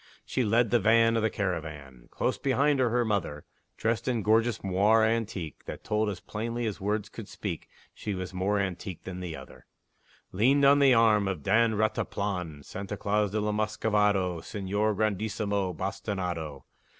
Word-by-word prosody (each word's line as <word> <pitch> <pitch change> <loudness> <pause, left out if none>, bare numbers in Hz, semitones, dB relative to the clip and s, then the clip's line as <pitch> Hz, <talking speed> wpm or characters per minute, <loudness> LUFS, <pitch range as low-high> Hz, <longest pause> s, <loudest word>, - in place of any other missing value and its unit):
She 130 - 0
led 115 +1 +2
the 120 - +4
van 115 +2 +4
of 115 - +2
the 110 - +2
caravan; 75 - -5
Close - - -1
behind 140 +1 +2
her, 125 -2 +3
her 120 +1 +1
mother 95 -9 -2 0.3
(Dressed 115 0 -1
in 120 -4 0
gorgeous 115 +1 +2
moire 100 +4 +3
antique, 110 -8 -2
That - - -7
told 105 0 0
as 95 -3 -5
plainly 115 +2 -4
as 105 -3 -4
words 105 +1 -1
could 110 -1 -9
speak, 95 -6 -5 0.2
She 105 -2 -4
was 95 0 -5
more 95 +3 0
antique 95 -2 -4
than 90 -1 -6
the 90 -3 -5
other) 65 0 -13 0.6
Leaned 135 +9 +3
on 140 +1 +6
the 135 -3 +6
arm 110 -3 +4
of 90 -7 -3
Don 115 +2 +3
Rataplan 100 -7 -2
Santa 100 +2 -6
Claus 105 +1 +1
de 110 +3 -1
la 105 0 0
Muscovado 105 -4 +1
Señor 105 +3 -1
Grandissimo 100 -2 -1
Bastinado. 90 -5 -4
105 Hz, 165 wpm, -28 LUFS, 95-110 Hz, 0.6 s, on